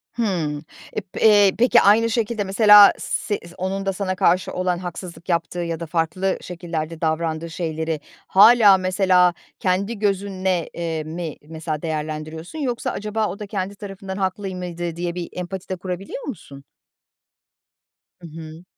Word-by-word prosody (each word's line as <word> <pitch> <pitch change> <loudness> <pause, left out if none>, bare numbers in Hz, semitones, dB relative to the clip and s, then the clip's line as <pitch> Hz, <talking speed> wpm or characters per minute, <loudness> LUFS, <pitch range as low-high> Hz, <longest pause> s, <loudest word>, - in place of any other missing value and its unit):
Hımm. 170 -10 -1 0.3
E, - - -2
p 185 - -10
eee, 205 -3 +6
peki, 240 0 +5
aynı 225 +3 +5
şekilde 225 -2 -1
mesela 205 +1 +8
s 205 - -2
zi 170 - -13
onun 195 +2 -3
da 195 - 0
sana 185 -1 -2
karşı 185 0 +2
olan 180 -1 0
haksızlık 175 0 -8
yaptığı 170 0 -1
ya 170 -2 -3
da 170 - -4
farklı 175 +4 -1
şekillerde 165 -2 -5
davrandığı 160 0 -1
şeyleri 160 -2 -3 0.3
hâlâ 210 0 +7
mesela 185 -1 +3 0.3
kendi 200 +4 -1
gözünle 190 -4 -1
eee, 165 -2 -3
mi 160 0 -5
mesela 155 -1 -5
değerlendiriyorsun, 155 - -5
yoksa 245 -4 -2
acaba 215 +1 -2
o 190 +1 -6
da 210 - -6
kendi 200 -1 -4
tarafından 195 -1 -7
haklı 195 +1 -2
y 185 - -5
mıydı 175 -2 -5
diye 175 0 -3
bir 175 -2 -5
empati 180 +1 -6
de 185 - -1
kurabiliyor 185 +7 -6
musun? 145 - -8 1.6
Hı 170 - -9
hı. 160 +1 -10
185 Hz, 155 wpm, -22 LUFS, 165-200 Hz, 1.6 s, mesela